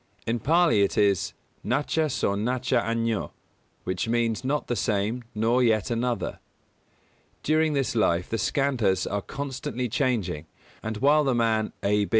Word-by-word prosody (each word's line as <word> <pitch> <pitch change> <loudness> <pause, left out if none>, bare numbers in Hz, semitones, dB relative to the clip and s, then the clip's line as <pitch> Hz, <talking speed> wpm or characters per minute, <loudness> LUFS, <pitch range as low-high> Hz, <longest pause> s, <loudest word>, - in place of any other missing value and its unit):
In 115 +1 0
Pālī 165 -6 +4
it 100 - -1
is 100 -3 +2 0.3
"nacha 150 +4 0
so 100 - 0
nacha 125 +5 0
añño" 115 -1 -1 0.5
which 95 +3 -2
means 115 0 0
not 145 +3 -1
the 120 - -2
same 105 +4 -1
nor 115 +4 +2
yet 110 -3 +2
another. 120 0 -1 1.0
During 155 0 +2
this 135 -2 0
life 90 -5 +2
the 115 - -2
Skandhas 115 -7 +1
are 100 0 -2
constantly 130 -1 -4
changing; 110 - -1 0.3
and 110 0 -4
while 145 +5 +4
the 135 -3 +1
man 110 -2 +1
A. 105 0 +2
115 Hz, 145 wpm, -26 LUFS, 105-130 Hz, 1.0 s, Pālī